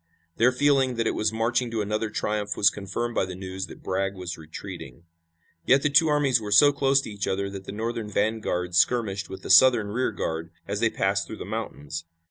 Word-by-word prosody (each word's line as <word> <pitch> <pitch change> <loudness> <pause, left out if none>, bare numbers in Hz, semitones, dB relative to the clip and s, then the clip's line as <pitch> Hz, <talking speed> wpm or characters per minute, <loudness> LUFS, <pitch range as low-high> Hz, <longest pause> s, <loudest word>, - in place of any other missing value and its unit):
Their 120 +3 +4
feeling 135 -1 +2
that 115 -1 -1
it - - +1
was 105 0 0
marching 115 +2 0
to 115 -2 -2
another 105 +2 -2
triumph 105 -1 -2
was 100 - +5
confirmed 105 +4 -4
by - - +1
the 90 0 -7
news 95 0 -6
that - - -13
Bragg 95 +1 -1
was 90 -2 -6
retreating. 80 +1 -9 0.6
Yet 135 +1 +4
the 145 - +1
two 160 +3 +5
armies 145 -5 +2
were 105 -1 -6
so 145 +8 +7
close 135 -1 +2
to 110 - -8
each 100 -1 -4
other 100 0 -2
that 95 -1 -8
the - - -6
Northern 110 +1 -4
vanguard 100 -4 -1
skirmished 100 0 +1
with 95 - -9
the - - -2
Southern 115 -1 +6
rearguard 85 -8 -2 0.2
as 100 - -2
they 115 - +3
passed 100 -1 0
through 110 - -7
the - - -7
mountains. 85 -7 -5
105 Hz, 210 wpm, -25 LUFS, 95-120 Hz, 0.6 s, so